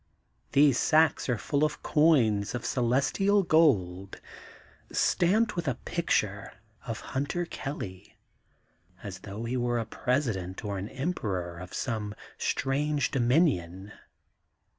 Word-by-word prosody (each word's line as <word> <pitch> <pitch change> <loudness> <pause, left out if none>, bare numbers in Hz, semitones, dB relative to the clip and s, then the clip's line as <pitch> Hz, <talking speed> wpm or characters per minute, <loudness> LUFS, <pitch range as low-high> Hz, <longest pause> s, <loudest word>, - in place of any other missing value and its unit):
These 140 -2 +5
sacks 155 -2 +3
are 120 - +1
full 145 +6 -1
of 150 -1 -1
coins 125 -10 +3
of 120 - -5
Celestial 140 - +2
gold, 100 - +2 0.7
stamped 210 +6 +2
with 175 -1 -3
a - - +1
picture 105 - -1 0.3
of 115 -2 -4
Hunter 145 +6 -1
Kelly, 100 - -7 0.9
as 95 -3 -7
though 100 +4 -7
he 120 +2 -2
were 120 0 0
a 115 - -1
Presi 125 +2 0
dent 95 +3 -6
or 100 -2 -3
an 100 +3 -5
Emperor 100 - -3
of 90 0 -9
some 105 -5 -3 0.2
strange 145 +1 0
dominion. 120 - +1
125 Hz, 120 wpm, -28 LUFS, 100-150 Hz, 0.9 s, These